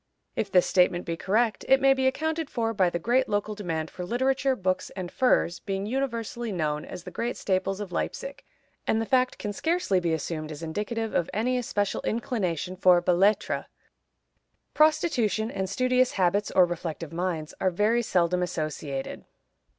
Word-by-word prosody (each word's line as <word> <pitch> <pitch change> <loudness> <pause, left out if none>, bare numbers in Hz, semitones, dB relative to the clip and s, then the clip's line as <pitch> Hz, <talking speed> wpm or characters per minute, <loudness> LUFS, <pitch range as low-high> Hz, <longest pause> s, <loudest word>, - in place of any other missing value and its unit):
If 200 - -2
this 180 -1 +5
statement 180 -1 +2
be 165 - -2
correct, 215 +6 0
it 265 - +6
may 270 0 +5
be 265 -1 +1
accounted 315 +3 -1
for 225 -2 -1
by 190 -4 +3
the 175 - -2
great 245 +8 +1
local 205 +1 -1
demand 165 -6 -3
for 180 - -6
literature, 260 +6 +1
books 185 -4 -1
and 185 -2 -5
furs 250 -9 +2
being 195 -1 -3
universally 235 -2 -2
known 150 -4 -1
as 175 - -8
the - - -8
great 240 +1 -3
staples 190 0 -1
of 205 -3 -6
Leipzig, - - -4 0.4
and 220 - +2
the 225 - -1
fact 255 +2 +2
can 205 - -4
scarcely 320 - +1
be 170 -2 -1
assumed 155 0 -3
as 155 +2 -8
indicative 210 +7 -3
of 170 - 0
any 245 +4 +1
especial 205 -5 -1
inclination 190 - -2
for 180 -1 +5
belles 175 0 +1
lettres. 205 +2 +2 1.1
Prostitution 250 - +2
and 190 -1 -3
studious 255 +4 +2
habits 195 +2 +1
or 185 - +5
reflective 165 -2 -5
minds 170 -3 -2
are 190 - +3
very 210 +6 +2
seldom 180 -4 +1
associated. 155 -5 -4
200 Hz, 170 wpm, -27 LUFS, 175-240 Hz, 1.1 s, it